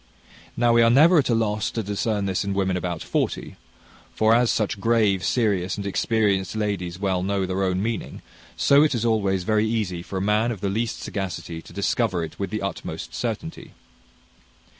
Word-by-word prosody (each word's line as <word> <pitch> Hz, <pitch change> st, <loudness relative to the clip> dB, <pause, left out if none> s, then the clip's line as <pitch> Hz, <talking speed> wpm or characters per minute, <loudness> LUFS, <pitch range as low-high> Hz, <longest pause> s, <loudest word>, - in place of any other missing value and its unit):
Now 120 Hz, 0 st, +3 dB
we 115 Hz, -, +5 dB
are 115 Hz, -, +5 dB
never 155 Hz, +8 st, +6 dB
at 135 Hz, -, 0 dB
a 120 Hz, -, +3 dB
loss 105 Hz, -2 st, 0 dB
to 115 Hz, -, -3 dB
discern 105 Hz, +1 st, -1 dB
this 95 Hz, -1 st, -1 dB
in 100 Hz, 0 st, -3 dB
women 95 Hz, -1 st, 0 dB
about 90 Hz, -2 st, -3 dB
forty; -, -, -2 dB, 0.6 s
for 110 Hz, +1 st, +4 dB
as 120 Hz, 0 st, +3 dB
such 105 Hz, -2 st, 0 dB
grave, 105 Hz, -4 st, +2 dB
serious, 100 Hz, -4 st, 0 dB
and 100 Hz, -, -5 dB
experienced 100 Hz, -2 st, 0 dB
ladies 100 Hz, -5 st, -2 dB
well 95 Hz, -2 st, 0 dB
know 95 Hz, 0 st, 0 dB
their 95 Hz, +1 st, -2 dB
own 95 Hz, 0 st, 0 dB
meaning, 115 Hz, 0 st, -4 dB, 0.3 s
so 140 Hz, +1 st, +5 dB
it 150 Hz, -4 st, +3 dB
is 120 Hz, 0 st, -1 dB
always 100 Hz, -5 st, +1 dB
very 110 Hz, +2 st, +1 dB
easy 100 Hz, -6 st, -2 dB
for 95 Hz, +2 st, -6 dB
a -, -, 0 dB
man 105 Hz, +4 st, +1 dB
of 110 Hz, -, -5 dB
the 100 Hz, -, -1 dB
least 115 Hz, +3 st, -2 dB
sagacity 90 Hz, -4 st, -5 dB
to -, -, -15 dB
discover 100 Hz, -2 st, 0 dB
it 80 Hz, -, -8 dB
with 100 Hz, -2 st, -2 dB
the 110 Hz, +1 st, -3 dB
utmost 100 Hz, -3 st, -5 dB
certainty. -, -, -5 dB
100 Hz, 190 wpm, -24 LUFS, 95-115 Hz, 0.6 s, never